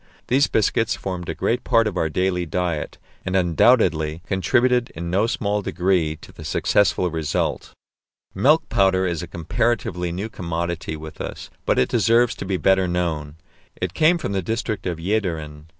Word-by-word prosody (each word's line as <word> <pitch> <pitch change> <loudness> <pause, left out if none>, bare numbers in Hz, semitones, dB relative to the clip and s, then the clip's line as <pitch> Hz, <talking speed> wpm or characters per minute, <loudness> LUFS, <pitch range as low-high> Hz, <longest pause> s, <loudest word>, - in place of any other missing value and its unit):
These 135 +3 +4
biscuits 110 +1 +1
formed 90 -3 -5
a - - -3
great - - 0
part 115 0 +3
of 105 -3 -2
our 80 -3 0
daily 90 +1 0
diet, 85 -1 -2 0.3
and 95 - -2
undoubtedly 85 -3 +3
contributed 120 +6 +2
in 85 0 -4
no 100 +5 +2
small 105 -2 -1
degree 90 -3 0
to - - -13
the - - -12
successful 90 -3 +1
result. 80 -2 -2 0.6
Milk 145 +12 +3
powder 95 -1 +2
is 85 -2 -1
a 85 - -6
comparatively 90 -1 -1
new 95 +5 -3
commodity 85 -4 -4
with 80 0 -9
us, - - -7 0.2
but - - +2
it 65 - +3
deserves 115 +2 +3
to - - -5
be 95 -1 -1
better 95 0 +3
known. 80 -4 -2 0.4
It - - -2
came 165 +3 +4
from 155 - -4
the 95 -1 0
district 110 +1 -3
of 85 -2 -2
Jæderen. 80 -6 -2
90 Hz, 165 wpm, -22 LUFS, 85-105 Hz, 0.6 s, These